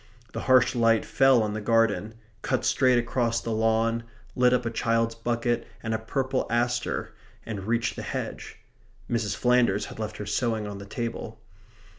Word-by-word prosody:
The - - -3
harsh 130 0 +5
light 115 -2 +3
fell 135 -4 +4
on 105 -1 -2
the 110 - -4
garden; 110 0 +1 0.3
cut 130 - -1
straight 130 -2 +3
across 120 -1 0
the 115 - -5
lawn; 115 +1 +1 0.3
lit 125 0 +4
up 125 -1 +1
a 115 - -1
child's 115 0 +1
bucket 120 +1 -1 0.2
and 110 -1 -2
a 110 - 0
purple 130 +3 -1
aster 120 +1 -1 0.3
and 100 -3 -5
reached 115 0 0
the - - -5
hedge. - - -5 0.5
Mrs. 115 -4 -1
Flanders 125 -5 +2
had - - -10
left 110 -1 -4
her 105 - -5
sewing 110 +1 -1
on 100 -1 -6
the 100 - -10
table. 115 +1 -5
115 Hz, 170 wpm, -26 LUFS, 110-120 Hz, 0.5 s, harsh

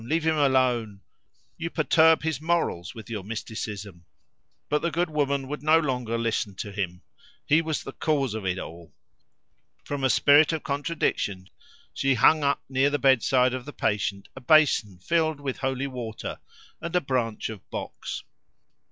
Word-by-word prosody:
leave 160 +7 -1
him 160 0 +3
alone! 130 -7 +2 0.6
You 165 0 -3
perturb 160 0 +4
his 155 -3 -2
morals 160 - -1
with 110 - -10
your 110 -5 -5
mysticism." 105 -4 -6 0.6
But 150 0 +1
the 170 - 0
good 170 0 -1
woman 140 -2 0
would 150 +2 -5
no 155 +2 +5
longer 125 -6 -1
listen 115 -3 -1
to 100 +2 -6
him; 90 -3 -4 0.4
he 155 +3 +4
was 160 -2 -3
the - - -7
cause 140 -7 0
of 110 -2 -4
it 95 -1 -1
all. 85 -2 -9 0.9
From 145 -1 -4
a 130 - +3
spirit 145 +5 +5
of 160 - -3
contradiction 140 - -2 0.4
she 135 -1 +1
hung 150 +6 +5
up 140 0 +1
near 135 +1 +2
the 145 - 0
bedside 130 -1 +3
of 130 -1 -5
the 145 - -8
patient 100 -1 -1
a 130 - -9
basin 130 - +4
filled 160 - 0
with 135 -3 -4
holy 135 0 -1
water 120 -5 -6 0.4
and 170 +1 -4
a - - +5
branch 120 -6 -2
of 110 -4 -10
box. - - -6
135 Hz, 165 wpm, -26 LUFS, 110-150 Hz, 0.9 s, no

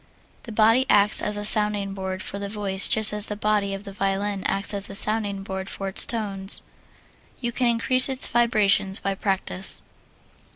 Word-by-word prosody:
The - - -6
body 225 +4 +3
acts 205 +1 +4
as 210 0 -3
a 205 - -2
sounding 210 -2 +3
board 190 -1 -5
for 200 - -6
the 200 0 -5
voice 200 -2 +1
just 220 -2 +2
as 210 0 -3
the 210 - -4
body 210 -1 0
of 195 - -9
the 200 - -7
violin 195 0 -2
acts 200 +1 0
as 200 -1 -2
a 195 - -7
sounding 205 -2 -1
board 190 0 -6
for 195 - -6
its 190 - -1
tones. 200 -4 +1 0.8
You 240 -1 -3
can 245 +1 0
increase 255 +3 +3
its 265 -1 0
vibrations 215 -5 +2
by 195 - -3
practise. 190 -1 -2
205 Hz, 180 wpm, -23 LUFS, 195-215 Hz, 0.8 s, acts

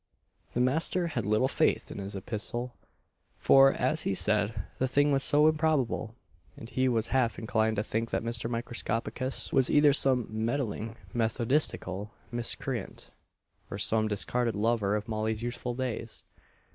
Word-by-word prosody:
The - - 0
master 165 +7 +1
had 120 -9 -3
little 110 +5 +2
faith - - 0
in - - -7
this 100 +1 -5
epistle; 120 +5 -3 0.6
for, 135 0 +6
as 135 +6 0
he 95 - -1
said, 105 +2 0 0.2
the 130 - +1
thing 145 +3 +2
was 135 -1 +2
so 150 +1 +5
improbable; 150 -8 0 0.4
and 115 - -9
he 130 +1 0
was 115 -2 0
half 125 -3 +1
inclined 110 -1 0
to 105 - -1
think 115 +2 -2
that - - -2
Mr. 115 -1 -3
Microscopicus 120 +2 -3
was 130 -2 +4
either 145 -1 +5
some 130 -4 +4
meddling 115 0 -3 0.2
methodistical 115 -4 -1 0.2
miscreant, 120 +1 -3 0.6
or - - -5
some 110 +2 +2
discarded 115 +3 0
lover 105 -1 +1
of 105 +1 -3
Molly's 110 0 -2
youthful 120 0 -4
days. 125 -3 -5
120 Hz, 145 wpm, -29 LUFS, 110-130 Hz, 0.6 s, for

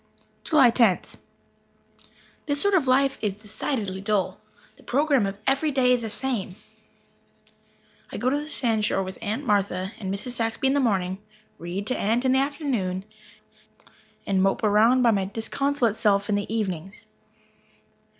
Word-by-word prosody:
July 275 -7 +5
Tenth. 230 -6 +2 1.3
This 285 -1 +1
sort 405 +4 +2
of 330 -8 +2
life 270 +1 +2
is 210 -3 -1
decidedly 210 -1 -4
dull. 200 -1 -1 0.3
The - - -20
program 275 -5 +1
of 195 0 -5
every 275 +3 +1
day 260 -3 +2
is 245 - +1
the 225 - -4
same. 210 -5 -3 1.6
I - - -5
go 255 +1 0
to - - +1
the 295 +1 -5
sandshore 220 -8 +1
with 185 0 -8
Aunt 225 +6 -3
Martha 195 -3 0
and 190 -3 -4
Mrs. 200 +5 -4
Saxby 230 +1 -2
in - - +2
the 285 - +2
morning, 190 -7 0 0.4
read 175 +4 -5
to 255 - -1
Aunt 230 +5 +1
in 260 - +3
the 265 - +3
afternoons, 270 - -2 1.2
and 190 -1 +1
mope 195 +3 +1
around 220 +5 +4
by 235 - +5
my 195 -3 0
disconsolate 230 +3 -1
self 200 -1 +1
in - - +1
the 205 +1 -2
evenings. 195 -2 -4
225 Hz, 155 wpm, -25 LUFS, 195-265 Hz, 1.6 s, July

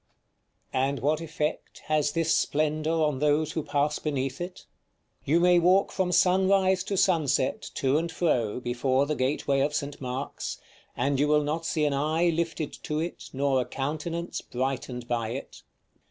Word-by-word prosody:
§ - - -49
XV. - - -46
And 135 +1 0
what 150 +5 +1
effect 155 -1 -3
has 150 -1 +1
this 165 -1 +1
splendor 155 +1 0
on 155 -4 +1
those 150 +1 +2
who 160 - -2
pass 145 0 0
beneath 135 -1 -2
it? 180 +1 -7 0.6
You 160 +5 +3
may 175 0 +5
walk 185 +3 +4
from 185 -2 0
sunrise 190 +1 +3
to 200 - -2
sunset, 150 -8 +2
to 135 +2 +2
and 165 0 -3
fro, 125 -10 0
before 130 +2 +1
the 150 - -1
gateway 135 0 0
of 145 +2 +1
St. 145 0 -4
Mark's, 130 +1 -4 0.4
and 135 +2 +1
you 145 - +3
will 150 0 +3
not 160 +3 -2
see 155 -1 +1
an 145 - +1
eye 155 +5 +1
lifted 165 -2 -2
to 150 - -3
it, 170 +2 -5
nor 135 -1 +1
a - - -3
countenance 155 +5 -3
brightened 125 -1 -3
by 115 -2 -1
it. 135 - -8
150 Hz, 170 wpm, -27 LUFS, 135-165 Hz, 0.6 s, may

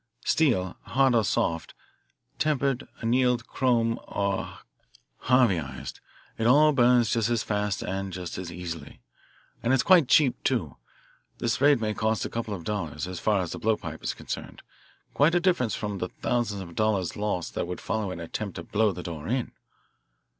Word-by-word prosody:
Steel, 110 - +2
hard 135 0 +2
or 115 -2 +4
soft, 85 -4 -1 0.6
tempered, 140 -3 0
annealed, 125 0 +2
chrome, 115 -3 +1
or 100 -1 -2 0.7
Harveyised, 95 - +1 0.4
it 110 - +2
all 150 +5 +6
burns 120 -4 +4
just 115 -1 +1
as 120 -2 +1
fast 105 -2 -1
and 95 +1 -3
just 90 -1 -6
as 90 -2 -6
easily. 85 -4 -7 0.6
And 120 - +2
it's 130 - +3 0.2
cheap 140 -2 +4
too. - - 0 0.6
This - - -1
raid 145 -2 +5
may 110 -1 -1
cost 110 +1 0
a - - -3
couple 115 -3 -3
of 85 - -9
dollars, 85 -6 -3
as 90 -1 -5
far 105 -3 +2
as 85 - -5
the - - -5
blowpipe 105 -8 -1
is - - -2
concerned - - -7 0.5
quite 155 +5 +4
a - - +5
difference 170 - +1
from 105 -2 -4
the 90 - -3
thousands 115 -5 -2
of 85 -2 -11
dollars' 100 -3 0
loss 105 -5 -2
that - - -3
would 90 - -5
follow 110 -2 -2
an 90 -2 -6
attempt 95 +4 -5
to 85 - -6
blow 105 +3 +1
the 90 -1 -7
door 80 -3 -6
in." 125 +2 -1
110 Hz, 170 wpm, -27 LUFS, 90-125 Hz, 0.7 s, all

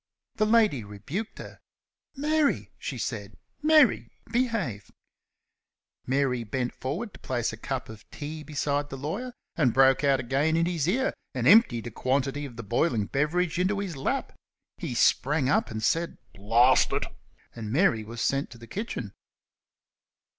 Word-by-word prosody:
The 215 - +2
lady 215 - +3
rebuked 135 - -6
her. - - -10 0.6
"Mary!" 300 +1 +1
she - - -5
said; - - -5 0.2
"Mary, 305 -3 +4 0.2
behave!" 225 - -1 1.2
Mary 130 -2 +1
bent 125 +3 -2
forward 180 - -4
to - - -13
place 120 -3 -2
a - - -4
cup 130 +3 -4
of 110 -2 -12
tea 155 +1 -6
beside 145 -1 -2
the 135 - -6
lawyer, 190 - -4 0.2
and 130 -8 +2
broke 135 0 +5
out 140 -2 +3
again 140 +6 +1
in 165 - +3
his 170 -4 -1
ear 260 +9 +1 0.2
and 125 -1 0
emptied 160 - +6
a 120 - -5
quantity 135 +4 -1
of 130 -4 -9
the 115 - -7
boiling 115 0 +1
beverage 160 - 0
into 190 +3 +1
his 195 -5 -3
lap. 135 - -2 0.5
He - - -4
sprang 140 -1 +3
up - - +2
and 110 -1 -5
said 165 +8 0 0.2
"Blast 115 +6 +4
it!" - - 0 0.5
and 110 -3 -6
Mary 125 - +3
was 115 +2 -7
sent 140 +1 0
to 120 - -12
the 115 - -12
kitchen. 125 - -5
140 Hz, 155 wpm, -27 LUFS, 120-180 Hz, 1.2 s, emptied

